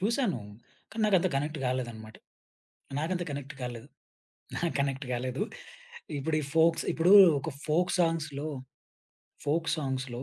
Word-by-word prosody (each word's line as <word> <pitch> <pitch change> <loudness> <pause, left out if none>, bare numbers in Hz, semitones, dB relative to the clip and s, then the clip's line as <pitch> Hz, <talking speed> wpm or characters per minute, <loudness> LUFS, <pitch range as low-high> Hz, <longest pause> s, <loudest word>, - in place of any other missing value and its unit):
చూసాను. 210 - 0 0.5
కానీ 225 -1 -3
నాకంత 190 -4 +3
కనెక్ట్ 150 +2 -2
గాలేదన్నమాట. 120 -4 -4 0.8
నాకంత 175 +3 -1
కనెక్ట్ 140 0 -6
కాలేదు. 120 -2 -6 0.7
నాకు 170 -1 0
కనెక్ట్ 135 -1 -1
గాలేదు. 130 +6 -2 0.8
ఇప్పుడు 155 +3 -1
ఈ - - -4
ఫోక్స్ 165 +1 +4
ఇప్పుడు 175 +4 +4 0.3
ఒక 160 - -4 0.2
ఫోక్ 175 +4 +2
సాంగ్స్‌లో, 155 -3 0 1.0
ఫోక్ 160 +2 +1
సాంగ్స్‌లో 130 -4 -3
150 Hz, 115 wpm, -29 LUFS, 130-165 Hz, 1.0 s, ఫోక్స్